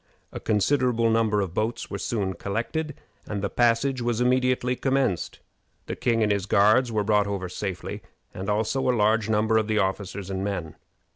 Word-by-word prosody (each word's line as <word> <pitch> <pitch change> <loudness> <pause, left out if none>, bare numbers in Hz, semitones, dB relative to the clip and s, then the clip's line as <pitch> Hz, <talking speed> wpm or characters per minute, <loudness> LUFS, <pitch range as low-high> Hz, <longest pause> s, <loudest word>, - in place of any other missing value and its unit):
A - - -6
considerable 115 +1 +2
number 110 -2 +2
of 95 -4 -3
boats 110 +4 -2
were - - -4
soon 100 -5 -2
collected, 120 - -3 0.3
and 105 -2 -4
the 100 - -1
passage 120 +2 +2
was 120 -1 0
immediately 125 0 +2
commenced. 130 -8 -1 0.4
The - - -4
king 115 -2 +1
and 105 - +2
his 100 -1 -1
guards 110 +5 +4
were 105 -2 0
brought 105 -1 +2
over 100 -2 -3
safely, 90 0 -5 0.3
and 95 +2 -5
also 110 +5 0
a 125 - +2
large 110 +1 +2
number 110 +1 +2
of 110 - -2
the 110 -1 0
officers 95 -1 -2
and 95 0 -2
men. 90 -6 -3
110 Hz, 180 wpm, -25 LUFS, 100-120 Hz, 0.4 s, guards